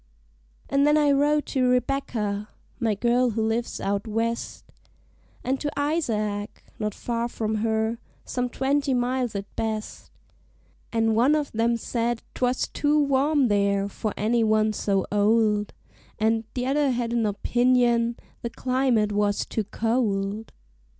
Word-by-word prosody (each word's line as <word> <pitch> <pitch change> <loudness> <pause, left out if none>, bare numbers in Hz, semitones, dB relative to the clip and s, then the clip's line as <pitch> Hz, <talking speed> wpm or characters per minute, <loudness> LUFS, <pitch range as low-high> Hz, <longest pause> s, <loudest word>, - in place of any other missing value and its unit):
An' 275 0 +2
then 295 +1 +4
I 295 -1 +4
wrote 295 +1 +2
to 255 -2 +2
Rebecca, 235 -5 -1 0.3
my 225 -4 +1
girl 240 +4 +2
who 220 0 -1
lives 230 +2 -2
out 200 +3 -2
West, 230 +2 -2 0.8
And 265 +1 -1
to 295 - -2
Isaac, 215 -9 -1 0.2
not 210 -1 -2
far 235 0 -2
from 220 -2 -2
her 220 +1 0 0.3
some 250 -1 -2
twenty 275 +1 0
miles 245 -1 -1
at 200 0 -6
best; 220 -1 -4 0.8
And 225 -1 +2
one 255 +7 +4
of 295 -2 -1
'em 230 +1 +2
said 235 0 -2
'twas 250 0 0
too 295 +1 +1
warm 280 0 +3
there 200 -1 +1
for 210 +1 -4
any 230 +2 +2
one 215 0 +2
so 195 -2 0
old, 210 0 +2 0.5
And 220 +1 +1
t' 250 -1 -1
other 280 +2 +2
had 240 -2 -1
an 230 -2 +1
opinion 240 +2 +2 0.2
the 235 - -3
climate 250 -4 +1
was 205 0 +1
too 220 - -3
cold. 215 -2 -1
230 Hz, 140 wpm, -25 LUFS, 215-255 Hz, 0.8 s, then